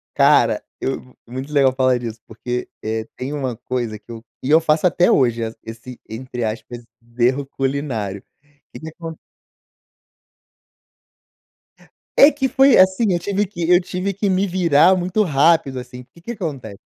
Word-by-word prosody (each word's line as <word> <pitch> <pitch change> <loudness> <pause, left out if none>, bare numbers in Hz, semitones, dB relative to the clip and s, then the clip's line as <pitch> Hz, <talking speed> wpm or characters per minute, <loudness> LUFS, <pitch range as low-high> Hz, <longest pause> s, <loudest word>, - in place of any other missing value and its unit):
Cara, - - +4 0.2
eu 130 -1 -5
muito 130 +5 -7
legal 135 -2 +4
falar 130 -1 +2
disso 115 -1 -7
porque, 120 +2 -5
eh, 110 0 -3
tem 130 +3 -5
um 130 -5 -3
coisa 120 -2 -4
que 105 +3 -21
eu 115 0 -9 0.2
e 135 - -3
eu 160 - +6
faço 160 +1 +2
até 175 0 +3
hoje 120 -3 +2 0.2
esse 115 +2 -10
entre 120 +1 -5
aspas 120 +2 -5 0.3
erro 130 +4 +2
culinário. 135 -8 -3 0.2
O 145 -1 -35
que - - -10
que 160 - -7
acon 165 0 -9 3.0
É 285 - +8
que 270 -2 -1
foi 270 +1 +5
assim, 190 +3 +4
eu 175 - +1
tive 200 +3 -1
que 175 -3 -4
eu 180 0 +6
tive 185 +2 -3
que 200 +2 -2
me 190 +1 +1
virar 180 -1 +4
muito 185 +4 0
rápido, 145 -3 +2
assim, 125 0 -9
que 170 - -18
que 210 +8 -6
acontece 140 - -6
140 Hz, 160 wpm, -20 LUFS, 120-175 Hz, 3.0 s, É